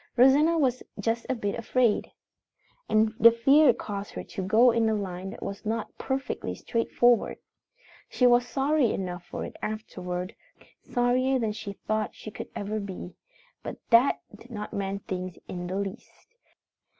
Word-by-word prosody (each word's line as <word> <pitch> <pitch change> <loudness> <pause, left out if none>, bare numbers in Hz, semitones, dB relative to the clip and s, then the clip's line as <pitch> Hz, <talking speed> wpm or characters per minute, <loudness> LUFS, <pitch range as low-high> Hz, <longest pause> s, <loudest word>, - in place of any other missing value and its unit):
Rosanna 290 +7 +6
was 255 -5 +1 0.2
just 225 +3 -1
a 260 - +1
bit 205 -4 -2
afraid. 235 -1 +1 0.8
And 215 0 +3
the 230 - +9
fear 270 +5 +5
caused 205 -3 -6
her - - -5
to 195 - -6
go 225 +6 +5
in 225 -1 +2
a 220 - +1
line 190 -2 -4
that 205 - -9
was 200 +1 -6
not 225 +1 -3
perfectly 265 0 -3
straightforward. 240 +1 +2 0.7
She 250 - +2
was 245 0 +5
sorry 275 -2 +2
enough 180 -2 -4
for - - -5
it - - -9
afterward 185 -4 -4 0.5
sorrier 255 +2 +1
than 225 -4 0
she 210 -1 -6
thought 215 +1 -2
she 215 - -9
could - - -8
ever 210 +2 -3
be. 190 -3 -7 0.5
But - - -6
that 235 +4 +5 0.2
did 230 +4 -16
not 210 -3 -6
mend 195 0 -3
things 185 -1 -4
in 175 -1 -5
the 185 - -4
least. 200 - -6
220 Hz, 160 wpm, -27 LUFS, 200-245 Hz, 0.8 s, the